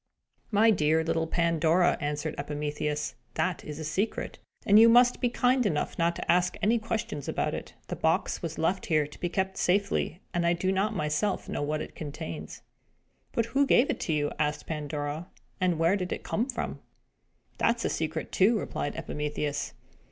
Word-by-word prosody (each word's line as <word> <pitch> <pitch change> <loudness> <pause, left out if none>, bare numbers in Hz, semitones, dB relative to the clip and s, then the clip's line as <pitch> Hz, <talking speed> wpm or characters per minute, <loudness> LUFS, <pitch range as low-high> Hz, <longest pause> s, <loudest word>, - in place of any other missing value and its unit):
"My 220 +1 +5
dear 160 -4 +2
little 165 0 0
Pandora," 170 +1 +3
answered 150 +1 -2
Epimetheus, 150 0 -2 0.2
"that 180 -2 -1
is 150 -1 -7
a 160 - -5
secret, 185 +8 -2 0.3
and 205 +1 +7
you 230 +1 +8
must 245 +1 +5
be 245 - +3
kind 250 +1 +2
enough 160 -9 -1
not 170 0 +2
to - - 0
ask 180 +1 +2
any 220 +3 +2
questions 220 - -3
about - - -1
it. - - -6
The - - -3
box - - 0
was 165 -1 -4
left 185 +4 0
here 155 -3 +3
to 150 - -13
be 175 - -1
kept 190 +1 -1
safely, 190 -2 +1
and 175 - +1
I 170 0 +3
do 185 +2 0
not 200 +3 0
myself 155 +5 -1
know - - -3
what 150 +1 -1
it - - -10
contains." 85 - -7 0.7
"But 230 - +1
who 280 +1 +4
gave 250 +1 +4
it - - -4
to 160 - -1
you?" 145 -1 0
asked 150 0 0
Pandora. 150 +1 -4 0.3
"And 180 -3 +2
where 165 +4 +3
did 185 -3 -3
it - - -3
come 235 +4 -1
from?" 245 - -3 0.8
"That 235 - +3
is 235 - -4
a - - +1
secret, 160 0 -3
too," 215 +5 +4
replied 165 - -3
Epimetheus. 150 0 -3
170 Hz, 185 wpm, -28 LUFS, 150-205 Hz, 0.8 s, you